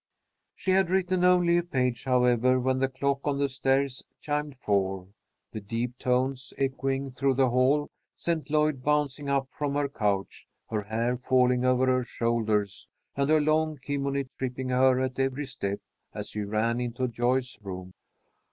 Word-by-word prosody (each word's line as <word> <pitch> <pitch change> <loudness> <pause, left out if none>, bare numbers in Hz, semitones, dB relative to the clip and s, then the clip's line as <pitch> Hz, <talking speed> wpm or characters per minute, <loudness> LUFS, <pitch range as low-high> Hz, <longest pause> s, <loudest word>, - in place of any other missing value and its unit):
She 190 - -1
had 190 -2 +3
written 185 -1 +1
only 180 -1 +5
a - - -2
page, 125 -7 -1
however, 125 0 +3
when 130 +1 +1
the 135 - +2
clock 140 +1 -1
on 145 -2 0
the 140 0 +1
stairs 135 0 0 0.2
chimed 150 -2 -3
four. 95 -4 -1 0.4
The 110 - -6
deep 115 +4 -4
tones 130 +1 0
echoing 135 0 -1
through 135 +1 +1
the 130 -1 +3
hall 135 +4 +3 0.3
sent 160 -4 -2
Lloyd 150 -3 +1
bouncing 145 -1 0
up 135 -1 0
from 145 -1 -2
her 145 -1 +1
couch, 105 -7 -2 0.2
her 110 -2 0
hair 115 +4 -1
falling 125 0 +2
over 130 0 +3
her 130 -1 +2
shoulders 110 -4 -1 0.3
and 140 +1 0
her 155 0 +5
long 155 0 +1
kimono 140 0 -2 0.2
tripping 130 0 -3
her 130 0 +4
at 130 0 -2
every 135 +2 0
step, 100 -6 -4 0.4
as - - -5
she 105 - -4
ran 110 +4 0
into 125 +1 -2
Joyce's 125 0 -1
room. 95 -2 -7
130 Hz, 160 wpm, -27 LUFS, 120-140 Hz, 0.4 s, only